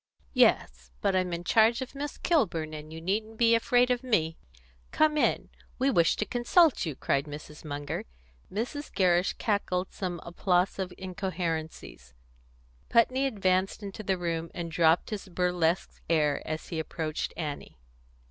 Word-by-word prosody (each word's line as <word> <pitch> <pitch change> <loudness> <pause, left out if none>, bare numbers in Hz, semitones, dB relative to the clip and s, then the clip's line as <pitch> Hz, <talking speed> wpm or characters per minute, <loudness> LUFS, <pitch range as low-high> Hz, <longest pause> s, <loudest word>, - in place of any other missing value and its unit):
"Yes; 65 +1 +2
but 190 - +1
I'm 185 -1 +1
in 170 0 -3
charge 225 +5 +4
of 260 - -11
Miss 285 +1 -5
Kilburn, 170 - 0
and 155 0 -8
you 160 - -7
needn't 215 +6 -2
be 230 0 +5
afraid 245 +2 +3
of 245 -1 +1
me. 170 -11 +1 0.5
Come 310 -1 +3
in. 300 - +1 0.3
We 265 +2 +2
wish 170 -8 +3
to 210 - -1
consult 250 - +3
you," 150 - -3
cried 140 +1 0
Mrs. 150 0 -9
Munger. 145 -1 -4 0.5
Mrs. 250 +8 -4
Gerrish 180 -2 +2
cackled 190 -4 -1
some 180 -3 -4
applausive 180 +2 0
incoherencies. 165 - -5 0.7
Putney 255 +3 +3
advanced 195 -3 0
into 200 +2 -6
the 190 -2 0
room, 165 -1 -2
and 170 -2 -4
dropped 165 +3 +3
his 200 -2 -5
burlesque 180 -1 0
air 150 -3 +2
as 155 0 -4
he 165 - -3
approached 155 -1 -3
Annie. 150 - -5
180 Hz, 150 wpm, -28 LUFS, 160-220 Hz, 0.7 s, be